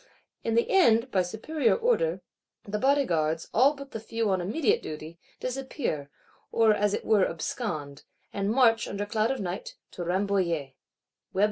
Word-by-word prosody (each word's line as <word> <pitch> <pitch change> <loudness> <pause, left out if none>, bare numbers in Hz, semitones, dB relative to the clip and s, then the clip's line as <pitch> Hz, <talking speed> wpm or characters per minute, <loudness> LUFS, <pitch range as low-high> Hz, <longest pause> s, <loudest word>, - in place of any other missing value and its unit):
In 225 - 0
the 235 - +3
end, 250 - +4
by 190 - +3
superior 225 - 0
Order, 485 +1 +1 0.4
the 210 +1 -3
Bodyguards, 170 - +1
all 275 +5 +5
but 275 -1 -10
the 225 - -5
few 225 -1 -1
on 185 -1 +1
immediate 220 - +1
duty, 155 +2 -8 0.2
disappear; 255 - -3 0.4
or 225 -1 +4
as 205 -1 +1
it - - -6
were 210 -4 +4
abscond; 155 - -4 0.3
and 200 0 -1
march, 230 -1 +4
under 200 +1 -3
cloud 215 +1 0
of 270 - -1
night, 180 -1 -5 0.2
to 175 - -6
Rambouillet. 175 -6 0
215 Hz, 150 wpm, -27 LUFS, 180-255 Hz, 0.4 s, all